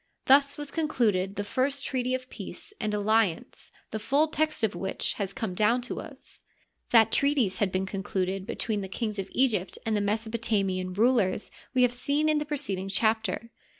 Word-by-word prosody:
Thus 280 +1 +5
was 290 -1 -4
concluded 215 - +1
the 205 - -2
first 275 +6 -1
treaty 255 -1 0
of 255 0 -6
peace 420 - -8
and 215 -1 0
alliance 210 -3 0 0.2
the 220 - -3
full 280 +8 +2
text 310 -4 0
of 220 - +2
which 190 +2 -2
has 195 -1 -1
come 215 -2 -3
down 220 +6 +2
to 250 - -5
us. - - -8 0.5
That 225 -2 +6
treaties 275 -9 +2
had 205 -4 +1
been 185 +1 0
concluded 190 -1 -2
between 215 -3 -2
the 190 - -4
kings 210 +1 -3
of 195 - -4
Egypt 220 -8 +1
and 220 -1 +1
the 205 - +1
Mesopotamian 205 -3 0
rulers 215 -2 +2 0.2
we 250 - +5
have 245 -1 +3
seen 285 +5 +1
in 305 -1 +3
the 300 - -3
preceding 205 -11 -3
chapter. 220 +1 0
220 Hz, 180 wpm, -28 LUFS, 195-260 Hz, 0.5 s, That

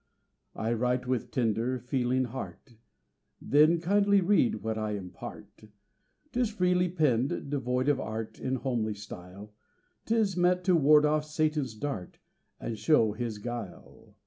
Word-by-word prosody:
I 115 +1 -1
write 125 +2 0
with 125 -2 -1
tender, 120 +1 0
feeling 125 +1 0
heart 125 0 -8 0.6
Then 155 +4 +4
kindly 200 +3 +3
read 175 - +2
what 110 0 -1
I 110 -1 -2
impart; 95 +2 -9 0.7
'Tis 245 -3 +1
freely 180 -3 +1
penned, 140 -5 0
devoid 130 -1 -1
of 145 -2 +3
art, 110 -1 -5
In 130 0 -1
homely 115 -5 -2
style, 100 0 -10 0.5
'Tis 220 -4 +1
meant 180 0 +2
to 180 -1 +4
ward 150 -1 +6
off 150 0 +1
Satan's 150 -5 -1
dart, 110 -7 -5 0.4
And 110 -2 -5
show 130 -9 +4
his 115 0 -4
guile. 115 -3 -8
130 Hz, 135 wpm, -29 LUFS, 110-155 Hz, 0.7 s, ward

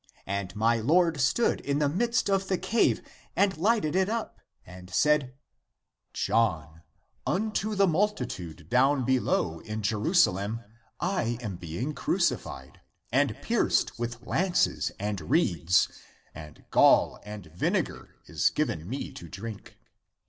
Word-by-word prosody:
And 100 -1 -3
my 115 +2 +2
Lord 160 +4 +3
stood 185 - +2
in 140 0 -1
the 150 -1 +2
midst 230 +10 +1
of 195 -1 +1
the 190 - +1
cave 230 +5 +1 0.3
and 200 -1 +2
lighted 190 -2 +1
it 190 +1 +2
up, 230 0 -3 0.3
and 90 0 -12
said, 145 +3 +2 0.8
John, 85 -8 0 0.5
unto 215 +1 -1
the 200 0 +4
multitude 155 - -2
down 130 +4 +3
below 95 -10 +1
in 110 +2 -6
Jerusalem 110 - +2 0.4
I 170 -11 -1
am 105 -7 -5
being 90 - -4
crucified, - - -2 0.3
and - - +2
pierced - - +1
with 120 0 -5
lances 180 +6 +1
and 100 -2 -2
reeds, 85 - +2 0.5
and 75 -1 -12
gall - - +5
and 105 -2 -9
vinegar 85 - -2
is - - +1
given 110 - -2
me 135 +4 -4
to 85 - -10
drink. 105 +4 -8
120 Hz, 125 wpm, -28 LUFS, -, 0.8 s, gall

